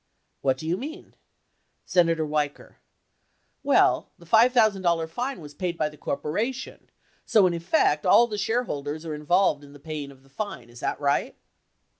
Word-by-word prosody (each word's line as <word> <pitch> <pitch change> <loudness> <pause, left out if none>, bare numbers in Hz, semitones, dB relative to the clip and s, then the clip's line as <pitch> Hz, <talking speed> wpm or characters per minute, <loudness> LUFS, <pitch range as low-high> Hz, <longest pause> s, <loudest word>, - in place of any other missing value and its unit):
What 130 -1 +1
do 155 - -8
you 175 +3 0
mean? 315 - -8 0.7
Senator 165 -3 +2
Weicker. 150 -1 -3 0.8
Well, - - +3
the 170 - -17
$5,000 205 -6 +3
fine 250 +11 -4
was 145 -1 -10
paid 175 +2 -3
by 155 -2 0
the 150 - -15
cor 140 - -3
poration, 240 - -4 0.4
so 210 -4 +4
in 180 - +2
effect, 170 - +1
all 235 - +6
the 210 -3 -5
shareholders 160 - -2
are 160 - -4
involved 150 +1 +1
in 145 0 -13
paying 150 -1 -6
the - - -23
fine, 135 - -6
is 120 - -13
that - - -2
right 140 -1 0
165 Hz, 155 wpm, -25 LUFS, 150-215 Hz, 0.8 s, all